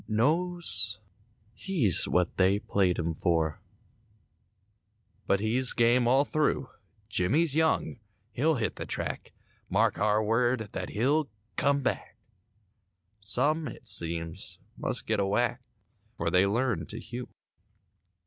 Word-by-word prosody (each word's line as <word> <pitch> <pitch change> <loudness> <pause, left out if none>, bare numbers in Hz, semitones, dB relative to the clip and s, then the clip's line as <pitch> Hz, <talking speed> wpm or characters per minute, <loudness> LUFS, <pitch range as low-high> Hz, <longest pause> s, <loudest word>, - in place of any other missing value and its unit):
Knows 120 - +1 0.5
he's 150 - +2
what 90 -1 0
they 95 +1 +3
played 95 -3 0
him 85 -1 -2
for— 80 -2 0 1.7
But 100 0 +2
he's 125 +4 +2
game 120 +1 +3
all 135 +4 +4
through. 150 -3 0 0.4
Jimmie's 135 - +1
young; 160 -5 +1 0.3
he'll 155 +5 +1
hit 115 -4 -2
the - - -6
track; - - -3 0.4
Mark - - +1
our 105 +1 +2
word, 115 0 0
that 90 - -5
he'll 140 +6 +1 0.3
"come 140 -1 +1
back"— - - -3 1.0
Some, 145 +10 0
it 120 - -10
seems, 85 +1 0 0.2
must - - -2
get 110 -2 0
a 100 - +1
whack— 120 +4 0 0.6
'Fore 85 - -1
they 90 +2 +4
learn 120 +2 -1
to 110 - -5
hew. 120 +1 -7
115 Hz, 120 wpm, -28 LUFS, 95-135 Hz, 1.7 s, all